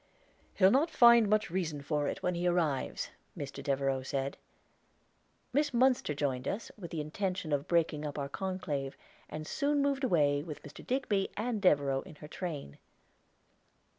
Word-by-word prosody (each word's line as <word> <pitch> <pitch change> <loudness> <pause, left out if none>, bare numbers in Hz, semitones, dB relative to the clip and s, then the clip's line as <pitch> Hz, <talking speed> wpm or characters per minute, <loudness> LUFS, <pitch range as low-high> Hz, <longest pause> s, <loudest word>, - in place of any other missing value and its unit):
"He'll 190 0 +6
not 290 +6 +3
find 235 -7 +7
much 215 -4 +2
reason 160 -6 -2
for 145 0 0
it, - - -4
when 180 - +1
he 175 +1 -1
arrives," 165 -6 0 0.3
Mr. 140 -1 -6
Devereaux 135 -1 0
said. 135 +1 -2 1.2
Miss 290 -1 +1
Munster 250 - +3
joined 135 -3 -1
us, 215 - -3
with 180 -6 -8
the 160 - -3
intention 180 +1 -2
of 145 0 0
breaking 165 -3 +1
up 150 -1 -4
our 140 -1 -2
conclave, 150 -5 -3 0.3
and 155 0 -6
soon 285 - 0
moved 280 -1 +1
away, 145 - +3
with 150 -1 -8
Mr. 145 - -11
Digby 225 -7 0
and 220 0 -1
Devereaux 140 -7 +3
in 170 - -12
her 150 - -11
train. 150 - -6
165 Hz, 160 wpm, -32 LUFS, 145-205 Hz, 1.2 s, find